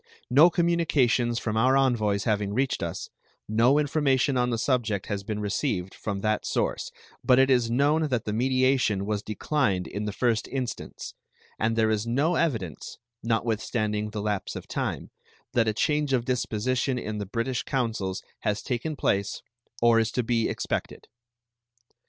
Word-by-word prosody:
No 150 +7 +7
communications 145 -9 +2
from 110 -2 -2
our 130 +4 +4
envoys 110 -7 +2
having 105 -2 0
reached 135 +1 0
us, 85 +2 -4 0.4
no 115 +6 +4
information 140 -2 +2
on 125 -1 +2
the 115 - 0
subject 115 -5 0
has 100 -1 -3
been 105 +1 -4
received 100 -2 -2
from 100 -2 -4
that 110 0 0
source; - - -1 0.3
but 125 - +5
it 135 0 +5
is 120 -3 +3
known 145 +6 +2
that 125 -5 -1
the 105 - -2
mediation 130 -4 +2
was 105 -1 -1
declined 105 -4 -1
in 105 +2 -4
the 105 - -2
first 115 +1 0
instance, 130 -3 -5 0.5
and 110 +1 +1
there 110 -1 +2
is 110 +1 -1
no 140 +9 +2
evidence, 110 - -2 0.2
notwithstanding 110 -2 -1
the 105 -1 -5
lapse 105 -2 -2
of - - -7
time, - - -3 0.4
that 115 -2 +3
a - - +3
change 150 +5 0
of 120 -2 +1
disposition 125 +1 0
in 110 -3 -4
the 100 - -4
British 115 +4 -2
councils 110 -8 -2 0.2
has 105 0 -1
taken 130 +5 -2
place 100 -6 -1 0.4
or 115 -1 +6
is 110 -1 +1
to 125 - 0
be 115 -1 +1
expected. - - -3
115 Hz, 160 wpm, -26 LUFS, 105-130 Hz, 0.5 s, No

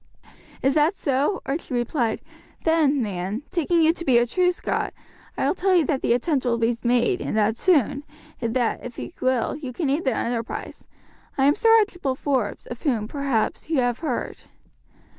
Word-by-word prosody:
"Is 270 +1 +3
that 310 +5 +3
so?" 285 +8 0
Archie 275 -2 -3
replied; 240 -1 -1 0.4
"then, 300 -5 +3
man, 200 +4 -3
taking 340 0 +2
you 320 +1 +5
to 340 - -7
be 260 -6 +4
a 240 - +4
true 360 +8 +2
Scot, 355 - -3 0.4
I - - 0
will - - +2
tell 380 0 +2
you 335 -4 +4
that 270 -1 -1
the 235 - +2
attempt 265 +3 0
will 240 -2 +1
be 230 +1 +1
made, 240 0 +2
and - - -2
that 215 +1 +2
soon, 285 - +2 0.4
and 230 0 -2
that, 245 -3 0
if 245 -1 -8
you - - -6
will, 255 -2 +1
you 285 -4 -6
can 275 +1 -1
aid 300 +5 0
the 260 -4 +1
enterprise. 230 -1 -4 0.5
I 270 - +3
am 285 - +5
Sir 455 - +2
Archibald 355 -11 0
Forbes, 260 -8 -1
of 240 - -8
whom, 230 -8 0
perhaps, 275 +1 -1
you 320 - +1
have 245 -1 0
heard." 300 -7 -4
265 Hz, 190 wpm, -24 LUFS, 235-315 Hz, 0.5 s, you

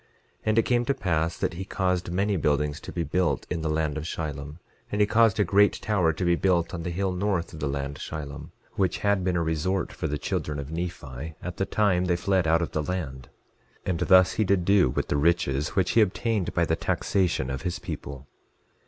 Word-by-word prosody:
11:13 - - -40
And 110 +1 +2
it - - +7
came 120 +1 +1
to 140 - +2
pass 85 -6 0
that - - -1
he 90 +3 -5
caused 90 -2 -1
many 100 +3 +1
buildings 75 -2 0
to - - -9
be 85 - -2
built 85 -6 0
in 85 -2 -1
the 80 - -1
land 75 -1 0
Shilom; 75 -2 -5 0.3
and 105 - -1
he 105 - +6
caused 110 -1 +3
a - - +5
great 100 +1 +4
tower 100 -7 +1
to 80 +3 -3
be 85 - +4
built 85 -1 +1
on 85 - -4
the 90 - -3
hill 95 +2 -1
north 90 -2 -1
of 80 - -8
the 75 - -1
land 70 0 -3
Shilom, 75 0 -6 0.2
which 95 -5 0
had 100 -2 +2
been 90 -1 0
a 85 - +1
resort 85 +4 -1
for - - -3
the 75 - -2
children 75 0 -2
of 70 +1 -6
Nephi 80 -4 -5
at 90 -1 -5
the 95 - -1
time 95 -3 +2
they 90 -1 +2
fled 90 0 +1
out 85 +1 +3
of - - -4
the 75 - -1
land; 75 -7 -4 0.6
and 90 -3 -1
thus 95 0 +6
he 110 - +1
did 95 -3 +1
do 100 -7 +5
with - - -2
the - - 0
riches 75 -1 +1
which 95 -2 +2
he 115 - +5
obtained 105 0 0
by 85 - +3
the 80 - +1
taxation 85 -6 0
of 65 0 -4
his 90 +3 -2
people. 70 -1 -7
85 Hz, 225 wpm, -26 LUFS, 75-95 Hz, 0.6 s, it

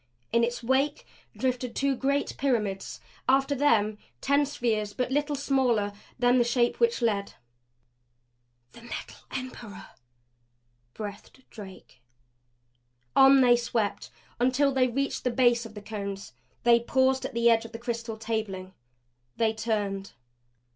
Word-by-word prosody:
In 235 - +4
its 240 0 -2
wake 270 +4 +1 0.3
drifted 250 -2 -2
two 275 -1 +1
great 280 +2 -1
pyramids; 215 -8 -1 0.3
after 270 +2 +3
them 220 -7 +2 0.2
ten 280 - +2
spheres 220 -6 -1
but 250 0 -2
little 290 +1 0
smaller 255 -7 +1 0.2
than 245 0 +4
the - - +5
Shape 240 0 +1
which 465 - +2
led. 200 -3 0 1.4
"The - - -15
Metal 235 - -8
Emperor!" 250 -6 -7 1.1
breathed 210 +5 -8
Drake. 190 - -12 1.1
On 270 0 +7
they 245 -1 +6
swept 235 -3 -2 0.3
until 260 +3 +3
they 260 -1 +3
reached 275 +3 -2
the 250 - +1
base 240 -2 +2
of 220 - -16
the 210 - -9
Cones. 200 -8 -6 0.3
They 235 0 +6
paused 260 +2 +1
at - - -5
the 235 0 +4
edge 225 0 +2
of 225 - -9
the 230 - -6
crystal 235 -1 -4
tabling. 215 -4 -4 0.6
They 225 -1 +2
turned. 205 -3 -2
235 Hz, 135 wpm, -27 LUFS, 215-265 Hz, 1.4 s, On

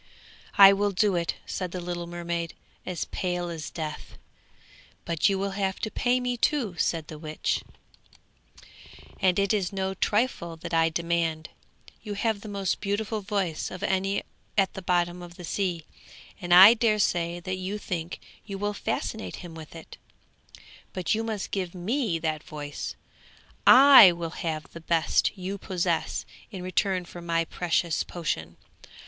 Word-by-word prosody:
'I 195 0 +10
will 205 +1 +1
do 200 0 +2
it,' 170 -1 -1
said 185 -1 -4
the 185 - -4
little 175 -1 -4
mermaid 170 -1 -4 0.3
as 180 -3 -3
pale 180 -1 -3
as 160 -3 -5
death. 155 -2 -6 0.9
'But 170 +3 +2
you 195 - +1
will 195 +1 -2
have 195 -1 -2
to 215 - -2
pay 250 +1 +1
me, 250 -1 -2
too,' 235 -7 0
said 165 -2 0
the 155 - -9
witch, 155 -1 -2 1.6
'and 185 -2 +3
it 200 0 +2
is 195 -4 0
no 190 -1 -2
trifle 205 -4 0
that 165 - -8
I 165 0 +4
demand. 165 -1 -1 0.5
You 210 -2 -5
have 215 0 -1
the 215 - -8
most 195 -2 -2
beautiful 210 +1 -2
voice 190 -5 -2
of 185 +1 -8
any 195 0 0 0.3
at 195 -2 +3
the 190 - -6
bottom 175 -1 0
of 175 0 -10
the 180 - -10
sea, 175 -2 -2 0.6
and 175 -1 -5
I 190 +5 +11
daresay 200 -7 +1
that 185 +2 -4
you 190 +3 -4
think 175 -4 -5 0.2
you 200 -2 -6
will 205 +1 -2
fascinate 220 +1 -3
him 170 - -9
with 160 0 -11
it; 165 - -11 1.0
but 185 +1 0
you 220 +1 0
must 220 -3 -4
give 185 -2 -3
me 210 +1 -1
that 155 -2 -2
voice; 145 -2 -6 0.7
I 260 -8 +10
will 170 -1 -5
have 160 -2 -3
the 170 - -9
best 165 +4 +1
you 190 +2 -5
possess 185 -2 -1 0.2
in 190 -4 -7
return 185 0 0
for 175 0 -10
my 165 -1 0
precious 170 -1 0
potion! 85 - -4
180 Hz, 160 wpm, -27 LUFS, 170-200 Hz, 1.6 s, I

